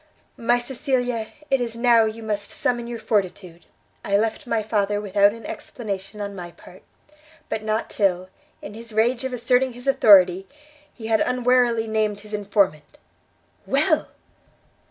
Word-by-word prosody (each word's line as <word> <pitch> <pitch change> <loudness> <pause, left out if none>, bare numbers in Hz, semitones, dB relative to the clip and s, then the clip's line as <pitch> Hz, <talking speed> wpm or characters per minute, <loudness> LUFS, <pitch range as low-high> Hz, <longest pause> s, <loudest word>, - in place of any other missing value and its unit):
"My 240 +1 +2
Cecilia, 245 -2 -2 0.2
it 270 -2 +3
is 230 -1 -3
now 235 -1 +4
you 220 +1 -5
must 205 -2 -3
summon 240 -1 -2
your 240 -1 -5
fortitude: 190 -5 -3 0.4
I 200 0 +2
left 225 +6 -2
my 225 -2 0
father 205 -1 0
without 205 0 +3
an 230 +1 -11
explanation 200 -3 -6
on 200 -1 -5
my 175 -2 -7
part; 180 +2 -16 0.7
but 220 - -2
not 215 +1 -1
till, 185 -3 0 0.4
in 200 - -8
his 230 +1 -10
rage 235 +4 +1
of 260 - -3
asserting 250 +1 +1
his 245 +2 -10
authority, 190 -7 +5 0.4
he 225 - -11
had 220 -1 +2
unwarily 250 -2 +2
named 215 -2 -1
his 210 0 -11
informant." 200 -7 0 0.7
"Well!" - - +2
220 Hz, 150 wpm, -23 LUFS, 200-240 Hz, 0.7 s, authority